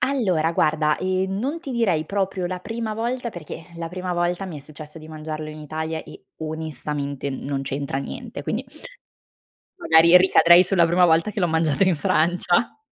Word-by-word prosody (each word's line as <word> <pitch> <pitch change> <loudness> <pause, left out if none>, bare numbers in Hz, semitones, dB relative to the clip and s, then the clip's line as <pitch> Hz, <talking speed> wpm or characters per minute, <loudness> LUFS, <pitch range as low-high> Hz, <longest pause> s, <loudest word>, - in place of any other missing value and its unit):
Allora 185 - +1
guarda, 155 -1 +2
ehm, 185 +1 -1
non 275 +9 -2
ti 285 -5 -7
direi 190 -10 +1
proprio 195 -2 -2
la 180 0 -4
prima 225 +2 -4
volta, 235 +2 -2
perché, 175 -7 -8
ehm, 170 - -13
la 165 - -4
prima 180 +1 -4
volta 175 +2 -1
mi 175 -5 -7
è - - -11
successo 150 +2 -11
di 155 - -12
mangiarlo 155 0 -6
in 155 - -9
Italia 160 +1 -4
e - - -14
onestamente 150 -3 -4
non 135 +1 -3
c'entra 140 0 -3
niente, 240 - -7
quindi 240 +4 -3 1.1
magari 170 - +6
ricadrei 180 -1 +6
sulla 180 -2 +3
prima 175 +2 +4
volta 165 +5 +3
che 205 - -4
l'ho 175 - +3
mangiato 160 0 +2
in 185 -3 +3
Francia. 175 +7 +1
170 Hz, 175 wpm, -23 LUFS, 155-190 Hz, 1.1 s, magari